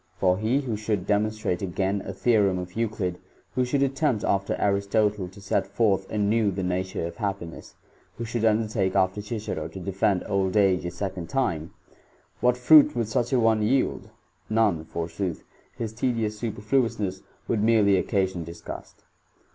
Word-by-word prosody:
For 90 Hz, 0 st, +2 dB
he 120 Hz, +6 st, +1 dB
who 120 Hz, -5 st, -3 dB
should 105 Hz, -3 st, -2 dB
demon 105 Hz, +1 st, +2 dB
strate. 110 Hz, -5 st, -3 dB
again 95 Hz, +1 st, -1 dB
a -, -, -5 dB
theorem 105 Hz, -6 st, +2 dB
of 90 Hz, 0 st, -6 dB
Euclid, 105 Hz, -5 st, -2 dB, 0.3 s
who 130 Hz, -, +1 dB
should 135 Hz, +3 st, 0 dB
*ftttfilnpt 135 Hz, -4 st, +1 dB
after 100 Hz, 0 st, +1 dB
Aristotle 100 Hz, 0 st, +1 dB
to 95 Hz, +3 st, -14 dB
set 100 Hz, -, -1 dB
forth 100 Hz, -4 st, +1 dB
anew 105 Hz, +1 st, +2 dB
the 95 Hz, 0 st, -3 dB
na 90 Hz, 0 st, 0 dB
ture 95 Hz, -3 st, -4 dB
of 85 Hz, -, -7 dB
happiness, 100 Hz, -6 st, -5 dB, 0.4 s
who 115 Hz, -, -4 dB
should 115 Hz, 0 st, -3 dB
undertake 110 Hz, -3 st, +1 dB
after 95 Hz, +1 st, +2 dB
Cicero 105 Hz, -7 st, -4 dB
to 80 Hz, +4 st, -9 dB
defend 95 Hz, 0 st, 0 dB
old 95 Hz, 0 st, 0 dB
age 95 Hz, -3 st, +3 dB
a -, -, -1 dB
second 90 Hz, -1 st, -5 dB
time 85 Hz, -, -1 dB, 0.3 s
— -, -, -35 dB
what 125 Hz, 0 st, +3 dB
fruit 145 Hz, +4 st, +7 dB
would 115 Hz, -3 st, -1 dB
such 120 Hz, +3 st, 0 dB
a 130 Hz, -, +3 dB
one 110 Hz, -2 st, +3 dB
yield? 130 Hz, +5 st, 0 dB, 0.4 s
None, 105 Hz, -8 st, +2 dB
forsooth; 85 Hz, +2 st, -4 dB, 0.3 s
his 110 Hz, -2 st, -4 dB
tedious 110 Hz, -3 st, -1 dB
superfluousness 105 Hz, -3 st, -1 dB, 0.3 s
would 110 Hz, -, 0 dB
merely 105 Hz, -4 st, +4 dB
occa 100 Hz, -3 st, +1 dB
sion 90 Hz, -2 st, -6 dB
disgust. 85 Hz, +1 st, -9 dB
105 Hz, 170 wpm, -26 LUFS, 95-115 Hz, 0.4 s, fruit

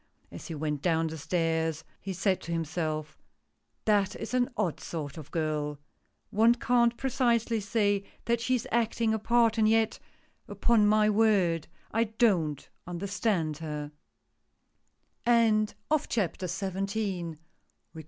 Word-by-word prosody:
As -, -, -9 dB
he 165 Hz, -, -5 dB
went 150 Hz, -1 st, -2 dB
down 165 Hz, -1 st, +2 dB
the 160 Hz, 0 st, -4 dB
stairs, 160 Hz, -1 st, 0 dB, 0.2 s
he 195 Hz, -, -5 dB
said 190 Hz, +1 st, 0 dB
to 170 Hz, -, -7 dB
himself: 155 Hz, -2 st, -2 dB, 0.4 s
" -, -, -49 dB
That 205 Hz, -2 st, +2 dB
is -, -, -6 dB
an 250 Hz, -1 st, +2 dB
odd 170 Hz, -, 0 dB
sort 150 Hz, -4 st, -5 dB
of 155 Hz, -2 st, -9 dB
girl! 150 Hz, -2 st, -2 dB, 0.5 s
One 225 Hz, +3 st, +5 dB
can't 235 Hz, -1 st, +2 dB
precisely 235 Hz, -3 st, +1 dB
say 205 Hz, -1 st, +1 dB, 0.2 s
that 235 Hz, 0 st, +1 dB
she 255 Hz, +2 st, +1 dB
is 245 Hz, -, -3 dB
acting 230 Hz, -1 st, +1 dB
a 220 Hz, -, 0 dB
part, 230 Hz, 0 st, +3 dB
and 215 Hz, 0 st, +4 dB
yet 225 Hz, 0 st, +2 dB, 0.3 s
— -, -, -40 dB
upon 225 Hz, -3 st, +4 dB
my 215 Hz, 0 st, +4 dB
word, 205 Hz, -7 st, +3 dB, 0.2 s
I 230 Hz, +1 st, +2 dB
don't 195 Hz, -, +1 dB, 0.2 s
understand 180 Hz, -3 st, -1 dB
her." 150 Hz, -2 st, -5 dB
200 Hz, 125 wpm, -29 LUFS, 160-225 Hz, 0.5 s, One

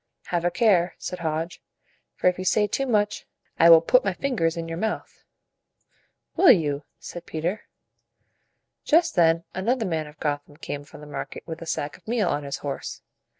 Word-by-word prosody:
"Have 170 Hz, -1 st, +1 dB
a 175 Hz, -, +3 dB
care," 185 Hz, -5 st, +3 dB
said 180 Hz, -, -6 dB
Hodge; 165 Hz, +1 st, -3 dB, 0.5 s
"for -, -, -7 dB
if 180 Hz, 0 st, +4 dB
you -, -, -3 dB
say 210 Hz, +2 st, +3 dB
too 270 Hz, +6 st, -1 dB
much, 210 Hz, -3 st, 0 dB, 0.3 s
I 170 Hz, -, +7 dB
will 165 Hz, -1 st, +9 dB
put 250 Hz, +10 st, +4 dB
my 195 Hz, -, 0 dB
fingers 180 Hz, -9 st, -1 dB
in 165 Hz, 0 st, -4 dB
your 165 Hz, +1 st, -4 dB
mouth." 220 Hz, +2 st, -4 dB, 1.1 s
"Will 380 Hz, -, +6 dB
you?" 145 Hz, -5 st, +1 dB
said 175 Hz, -1 st, -9 dB
Peter. 175 Hz, +7 st, -3 dB, 1.2 s
Just 325 Hz, +2 st, +3 dB
then 165 Hz, -1 st, +4 dB
another 225 Hz, +5 st, 0 dB
man 160 Hz, -4 st, -2 dB
of 150 Hz, +1 st, -15 dB
Gotham 145 Hz, -1 st, -3 dB
came 145 Hz, -1 st, -5 dB
from 145 Hz, -, -14 dB
the -, -, -10 dB
market 145 Hz, -2 st, -6 dB
with 165 Hz, 0 st, -7 dB
a 165 Hz, -, -7 dB
sack 145 Hz, -1 st, -3 dB
of 185 Hz, -, -30 dB
meal 220 Hz, -5 st, +1 dB
on 145 Hz, -, 0 dB
his 140 Hz, -1 st, -4 dB
horse. 140 Hz, -, -5 dB
170 Hz, 185 wpm, -25 LUFS, 155-205 Hz, 1.2 s, will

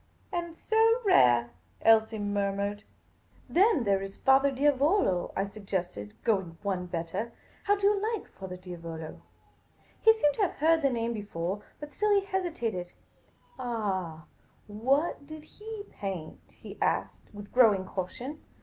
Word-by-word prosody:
" -, -, -35 dB
And 340 Hz, -2 st, -3 dB
so 450 Hz, +2 st, +3 dB
rare! 120 Hz, -, +5 dB
" -, -, -35 dB
Elsie 220 Hz, 0 st, +5 dB
murmured. 205 Hz, 0 st, -1 dB, 0.7 s
"Then 375 Hz, -, +4 dB
there 200 Hz, -2 st, +2 dB
is 195 Hz, 0 st, -8 dB
Era 270 Hz, +1 st, +6 dB
Diavolo? 280 Hz, -, +2 dB
" -, -, -26 dB
I 195 Hz, -, +2 dB
suggested, 190 Hz, -, -5 dB
going 190 Hz, -7 st, 0 dB
one 185 Hz, -3 st, -2 dB
better. 175 Hz, +6 st, -4 dB
" -, -, -29 dB
How 410 Hz, -, +4 dB
do 400 Hz, -1 st, -2 dB
you 405 Hz, -1 st, +3 dB
like 440 Hz, -, -4 dB
Fra 185 Hz, -1 st, -8 dB
Diavolo? 165 Hz, -3 st, -8 dB, 0.4 s
" -, -, -34 dB
He 445 Hz, -, +8 dB
seemed 295 Hz, -8 st, +3 dB
to -, -, 0 dB
have 385 Hz, -, +2 dB
heard 320 Hz, +2 st, +3 dB
the 275 Hz, -, +3 dB
name 235 Hz, -1 st, -1 dB
before, 200 Hz, -2 st, -4 dB, 0.2 s
but 295 Hz, 0 st, -9 dB
still 415 Hz, -1 st, +3 dB
he 390 Hz, -, -7 dB
hesitated. 240 Hz, -, -3 dB, 0.7 s
"Ah 190 Hz, -10 st, -3 dB, 0.2 s
— -, -, -35 dB
what 270 Hz, +8 st, 0 dB
did 310 Hz, 0 st, -9 dB
he 425 Hz, +5 st, -8 dB
paint?" 185 Hz, -6 st, -6 dB
he -, -, -12 dB
asked, -, -, -1 dB
with 205 Hz, -1 st, -11 dB
growing 215 Hz, -7 st, +5 dB
caution. 235 Hz, +11 st, -5 dB
220 Hz, 160 wpm, -29 LUFS, 185-310 Hz, 0.7 s, He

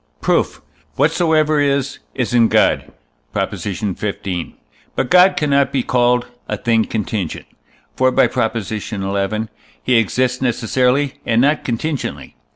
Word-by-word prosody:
Proof. -, -, 0 dB, 0.3 s
Whatsoever 155 Hz, 0 st, +2 dB
is, 140 Hz, -1 st, 0 dB, 0.2 s
is 125 Hz, -2 st, -2 dB
in 115 Hz, -2 st, +5 dB
God -, -, +2 dB, 0.4 s
(Prop. -, -, -1 dB
xv.). 100 Hz, -3 st, -4 dB, 0.4 s
But 125 Hz, -, -1 dB
God 180 Hz, +1 st, +6 dB
cannot 140 Hz, -2 st, +2 dB
be 130 Hz, -3 st, 0 dB
called 125 Hz, 0 st, +2 dB, 0.2 s
a -, -, -1 dB
thing 115 Hz, -2 st, +1 dB
contingent. 105 Hz, -5 st, -3 dB, 0.5 s
For 130 Hz, 0 st, +3 dB
(by 130 Hz, -, +4 dB
Prop. 115 Hz, -2 st, -1 dB
xi.) 110 Hz, +1 st, -4 dB
he 100 Hz, +4 st, -3 dB
exists 125 Hz, +3 st, 0 dB
necessarily, 125 Hz, +3 st, +1 dB
and 115 Hz, -1 st, +1 dB
not 145 Hz, +4 st, +2 dB
contingently. 135 Hz, +5 st, -4 dB
125 Hz, 125 wpm, -18 LUFS, 110-140 Hz, 0.5 s, God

